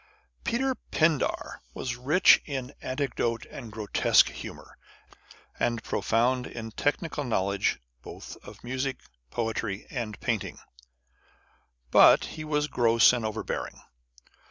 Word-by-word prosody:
Peter 265 +3 0 0.2
Pindar 155 -3 +1
was 125 -1 -3
rich 145 +9 +5
in 135 -3 -4
anecdote 130 -4 -2
and 115 - -8
grotesque 110 -2 +3
humour, - - -10 0.8
and 115 -2 0
profound 125 +3 +1
in 115 -1 -7
technical 145 +5 -1
knowledge 100 -5 0 0.2
both - - -9
of - - -14
music, 130 +2 -2 0.3
poetry, 110 - -3
and 115 -6 -4
painting, 115 -5 -2 1.3
but - - +7
he 155 - -7
was 150 -1 0
gross 115 -3 +5
and 120 -2 -1
overbearing. 110 0 -4
125 Hz, 110 wpm, -28 LUFS, 115-140 Hz, 1.3 s, but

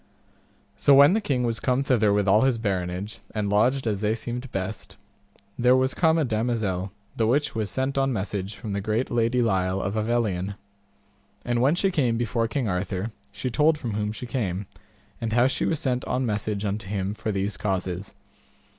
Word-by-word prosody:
So 140 +5 +5
when 140 +5 +8
the 220 - +1
king 130 -9 0
was 115 -1 -1
come 130 +1 +1
thither 115 -6 +3
with 100 -1 +2
all 105 +3 +5
his 130 -3 +3
baronage, 95 -1 -3 0.2
and 105 -2 -1
lodged 125 +6 +2
as 105 -3 0
they 105 +1 +1
seemed 120 +3 -5
best, 95 +2 -5 0.6
there 125 +1 +5
was 130 +1 +2
come 160 -2 +3
a 160 - +2
damosel 110 -5 -1 0.2
the 110 - +1
which 145 +5 +1
was 110 -3 -2
sent 135 +1 -1
on 135 0 +2
message 100 -2 -3
from 110 -4 -6
the 100 - -1
great 110 +5 -1
lady 120 +1 +2
Lile 95 -3 +1
of 95 +1 -2
Avelion. 105 -4 0 0.9
And 120 0 +1
when 140 +6 +4
she 195 +2 +1
came 125 -9 +1
before 115 0 0
King 120 +1 -2
Arthur, 95 +3 -2 0.2
she 115 +5 -4
told 150 +6 +3
from 120 -7 -4
whom 105 0 -1
she 125 +4 -7
came, 105 -6 -2 0.6
and 115 -1 -2
how 120 +2 +4
she 135 - 0
was 160 - 0
sent 125 -2 -1
on 130 0 -1
message 105 -1 -2
unto 100 -1 -3
him 100 0 -2
for 110 0 -3
these 100 +1 -1
causes. 95 -1 -3
110 Hz, 190 wpm, -25 LUFS, 100-125 Hz, 0.9 s, when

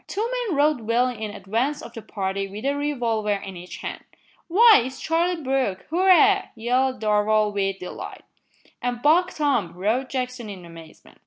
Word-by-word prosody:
Two 430 +3 -2 0.2
men 330 - -1
rode 295 -3 +3
well 230 +3 +2
in 220 -3 -5
advance 225 +8 -2
of - - -10
the 225 - -7
party 195 -1 -3
with 205 +5 -8
a 280 - +2
revolver 235 -8 -1
in 195 -1 -7
each 180 +1 -9
hand. - - -6 0.4
"Why, 435 - +7
it's 260 +1 -7
Charlie 335 0 0
Brooke! 260 -8 -1
Hurrah!" 365 -1 +5
yelled 255 +3 0
Darvall 210 0 +2
with 195 -1 -1
delight. 180 - -8 0.6
"An' 245 -1 -2
Buck 350 +5 +4
Tom!" 255 - 0
roared 220 +8 -1
Jackson 250 -3 -4
in 185 -3 -9
amazement. 165 -2 -14
240 Hz, 165 wpm, -24 LUFS, 205-290 Hz, 0.6 s, Why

